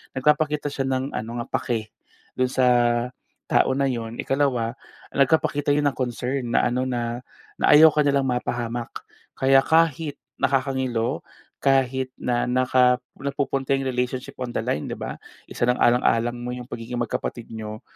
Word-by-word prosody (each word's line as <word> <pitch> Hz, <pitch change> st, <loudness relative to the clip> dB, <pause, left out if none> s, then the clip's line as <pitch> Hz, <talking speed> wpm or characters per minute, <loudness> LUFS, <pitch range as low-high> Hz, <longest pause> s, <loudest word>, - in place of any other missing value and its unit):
Nagpapakita 150 Hz, +1 st, +1 dB
siya 135 Hz, -1 st, -2 dB
ng 130 Hz, +1 st, -1 dB
ano 115 Hz, +2 st, -4 dB
nga, -, -, -13 dB
pake 110 Hz, -3 st, -3 dB, 0.5 s
do'n 130 Hz, -, +3 dB
sa 130 Hz, 0 st, +2 dB, 0.8 s
tao -, -, +4 dB
na 140 Hz, -, +1 dB
yun. 115 Hz, -2 st, -5 dB
Ikalawa, 130 Hz, -4 st, 0 dB, 0.4 s
nagpapakita 145 Hz, 0 st, +2 dB
yun 150 Hz, -, +1 dB
ng -, -, -19 dB
concern 125 Hz, -1 st, -2 dB
na -, -, +4 dB
ano, 130 Hz, +1 st, 0 dB
na 120 Hz, -1 st, -2 dB, 0.4 s
na -, -, +2 dB
ayaw 155 Hz, +1 st, +9 dB
ka 150 Hz, -, -1 dB
nilang 140 Hz, -2 st, +3 dB
mapahamak. 120 Hz, -2 st, -3 dB, 0.4 s
Kaya 135 Hz, 0 st, +5 dB
kahit 160 Hz, -1 st, +2 dB, 0.2 s
nakakangilo, 130 Hz, -2 st, 0 dB, 0.4 s
kahit 130 Hz, -1 st, +1 dB
na 120 Hz, -1 st, 0 dB
naka 125 Hz, 0 st, +3 dB, 0.2 s
napupunta 140 Hz, -1 st, -1 dB
yung 135 Hz, -1 st, 0 dB
relationship 125 Hz, 0 st, -3 dB
on 125 Hz, -2 st, -5 dB
the 110 Hz, -, -1 dB
line, 115 Hz, -10 st, -2 dB
'di -, -, -4 dB
ba? -, -, -6 dB, 0.3 s
Isasaalang-alang 120 Hz, -1 st, +2 dB
mo 125 Hz, +1 st, -5 dB
yung 125 Hz, 0 st, -8 dB
pagiging 120 Hz, +1 st, -5 dB
magkapatid 120 Hz, 0 st, -4 dB
niyo. 110 Hz, -1 st, -7 dB
130 Hz, 145 wpm, -24 LUFS, 120-135 Hz, 0.8 s, ayaw